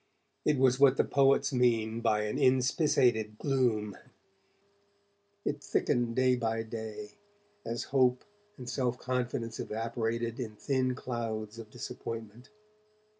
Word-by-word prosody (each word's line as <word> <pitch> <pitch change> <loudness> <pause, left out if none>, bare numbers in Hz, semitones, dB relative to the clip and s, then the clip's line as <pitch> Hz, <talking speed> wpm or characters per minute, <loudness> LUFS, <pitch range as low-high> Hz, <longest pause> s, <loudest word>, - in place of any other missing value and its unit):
It 150 - +3
was 130 0 +3
what 135 -1 +6
the - - +4
poets 135 0 +3
mean 115 -3 +2
by 105 -2 +2
an 105 +6 -2
'inspissated' 130 -4 +2
gloom; 115 -7 0 1.5
it 145 0 -2
thickened 120 -1 0
day 130 0 +4
by 115 -2 -1
day, 110 -2 -7 0.5
as 115 0 -3
hope 125 -2 +3 0.3
and 125 -3 -9
self 125 -1 -1
confidence 125 -3 -3
evaporated 115 +1 -2
in 110 -4 -5
thin 130 +2 0
clouds 115 -4 -4
of 110 -2 -9
disappointment. 115 0 -7
120 Hz, 120 wpm, -30 LUFS, 110-130 Hz, 1.5 s, what